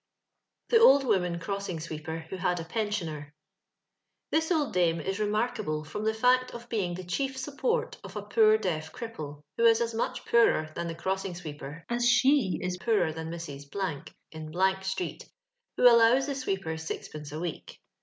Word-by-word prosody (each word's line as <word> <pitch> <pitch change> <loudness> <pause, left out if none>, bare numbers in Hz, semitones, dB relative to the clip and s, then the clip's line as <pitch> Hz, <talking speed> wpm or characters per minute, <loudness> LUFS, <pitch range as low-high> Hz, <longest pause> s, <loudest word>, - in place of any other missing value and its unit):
The 465 - +6
Oij) 280 -10 +7
Woman 180 -8 +1
Crossino 195 0 -3
Swekpkr 160 0 -6
vbo^ 190 - -5
HAD 180 -1 0
A - - -4
PkNSIONER. 165 -7 -3 1.0
This 320 +2 +1
old 305 -5 +1
dame 170 -2 +2
is 195 +4 -3
remarkable 210 -7 -1
from 210 +8 -5
tho 220 - +2
faot 250 +3 +3
of 235 0 -9
being 185 -6 -1
the 185 - -6
chief 265 +9 -2
support 460 - -1
of 195 0 -10
a 210 - -4
poor 215 +1 +5
deaf 160 -6 -3
cripple, 155 - -7
who 230 - +3
is 230 -1 +6
as 235 -1 -1
much 225 - -2
poorer 155 -9 +3
thou 170 - -3
the 165 -1 -4
cross 190 +3 -1
iny 180 -2 -5
swcepcr 150 -1 -8
as 240 0 +2
she 255 -5 +4
is 180 0 -2
pooler 205 -7 +1
than 160 0 -6
Mrs. 145 -4 -7
•, 165 -6 -4 0.2
ill 180 +5 0
street, 190 -2 -4 0.5
who - - 0
allows 235 +2 +6
the 285 - -2
sweeper 195 -11 -3
sixpence 155 -2 -6
a - - -6
weck. 165 0 -5
190 Hz, 175 wpm, -28 LUFS, 165-230 Hz, 1.0 s, Oij